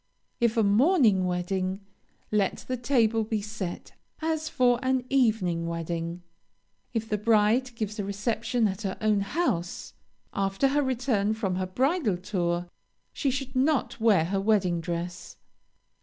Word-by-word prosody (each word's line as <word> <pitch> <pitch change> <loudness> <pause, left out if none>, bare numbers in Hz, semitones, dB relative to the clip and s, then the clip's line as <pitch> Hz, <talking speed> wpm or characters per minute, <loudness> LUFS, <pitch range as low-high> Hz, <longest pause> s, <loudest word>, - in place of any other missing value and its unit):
If 235 -1 +2
a 225 - +4
morning 215 - +4
wedding, 185 +1 -1 0.5
let 205 -2 0
the 255 - -1
table 235 -3 +2
be 220 0 -1
set 205 -4 -6 0.3
as 315 -1 -1
for 245 -4 +3
an 260 -1 0
evening 210 -10 +2
wedding. 170 +1 -4 0.7
If 225 -1 -2
the 210 -1 -1
bride 230 +3 +2
gives 215 -1 -4
a - - 0
reception 220 +3 0
at 190 +1 -4
her 195 -3 -3
own 215 -2 +2
house, 200 - -2 0.4
after 195 +7 +1
her 290 +2 +2
return 240 -6 0
from 195 -5 -2
her 185 0 -2
bridal 255 - +1
tour, 175 -2 -2 0.5
she 280 - 0
should 265 0 -4
not 270 0 +1
wear 210 -8 +4
her 195 +3 -1
wedding 195 -5 +2
dress. 175 +1 -5
215 Hz, 140 wpm, -27 LUFS, 185-250 Hz, 0.7 s, a